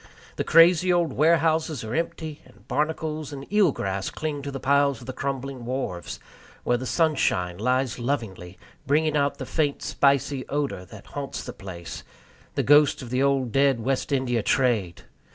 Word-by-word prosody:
The -, -, 0 dB
crazy 175 Hz, +2 st, +5 dB
old 170 Hz, -5 st, +1 dB
warehouses 160 Hz, -2 st, +2 dB
are 110 Hz, +1 st, -5 dB
empty; 160 Hz, -1 st, -3 dB
and -, -, -21 dB
barnacles 155 Hz, -1 st, -2 dB
and 140 Hz, -1 st, -7 dB
eel 205 Hz, -6 st, +5 dB
grass 95 Hz, -4 st, -3 dB
cling 150 Hz, -2 st, -4 dB
to 140 Hz, -, -5 dB
the 135 Hz, -1 st, -5 dB
piles 140 Hz, 0 st, +2 dB
of 125 Hz, -, -12 dB
the 130 Hz, -, -5 dB
crumbling 135 Hz, -1 st, -4 dB
wharves, 120 Hz, -8 st, -4 dB, 0.4 s
where 120 Hz, -, +2 dB
the 130 Hz, +1 st, -5 dB
sunshine 110 Hz, -, +1 dB
lies 125 Hz, +1 st, 0 dB
lovingly, 105 Hz, -9 st, -3 dB, 0.3 s
bringing 155 Hz, +2 st, +2 dB
out 140 Hz, -1 st, +1 dB
the -, -, -5 dB
faint 145 Hz, -3 st, -1 dB
spicy 140 Hz, -1 st, +1 dB
odor 140 Hz, -10 st, -2 dB
that 105 Hz, +1 st, -13 dB
haunts 140 Hz, -1 st, -6 dB
the -, -, -7 dB
place 85 Hz, -3 st, -8 dB, 0.5 s
the -, -, +1 dB
ghost 145 Hz, -1 st, +5 dB
of 120 Hz, -, -9 dB
the 130 Hz, +1 st, +1 dB
old 135 Hz, -3 st, +1 dB
dead 135 Hz, -1 st, +3 dB
West 130 Hz, +5 st, -1 dB
India 130 Hz, -4 st, +1 dB
trade! 110 Hz, -7 st, 0 dB
140 Hz, 170 wpm, -25 LUFS, 120-150 Hz, 0.5 s, crazy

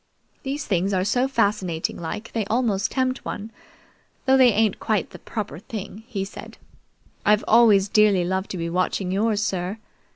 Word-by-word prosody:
"These 280 Hz, +1 st, -4 dB
things 195 Hz, 0 st, 0 dB
are 185 Hz, -1 st, +1 dB
so 250 Hz, +6 st, +1 dB
fascinating 200 Hz, -9 st, 0 dB
like 210 Hz, +7 st, -5 dB
they 225 Hz, -, 0 dB
almost 215 Hz, -2 st, 0 dB
tempt 260 Hz, -1 st, -1 dB
one, 210 Hz, +2 st, -6 dB, 0.7 s
though 265 Hz, -1 st, +5 dB
they 255 Hz, -2 st, +6 dB
ain't 215 Hz, -1 st, +1 dB
quite 215 Hz, -3 st, -1 dB
the -, -, -11 dB
proper 205 Hz, -, -5 dB
thing," 215 Hz, +1 st, -8 dB
he 200 Hz, -6 st, -3 dB
said. 200 Hz, -, -10 dB, 0.7 s
"I've 210 Hz, 0 st, +3 dB
always 215 Hz, -4 st, +5 dB
dearly 205 Hz, -3 st, +4 dB
loved 190 Hz, +2 st, -2 dB
to 185 Hz, -, -4 dB
be 170 Hz, -1 st, -3 dB
watching 180 Hz, +2 st, -1 dB
yours, 210 Hz, +2 st, +1 dB
sir. 190 Hz, 0 st, -2 dB
210 Hz, 165 wpm, -23 LUFS, 190-225 Hz, 0.7 s, they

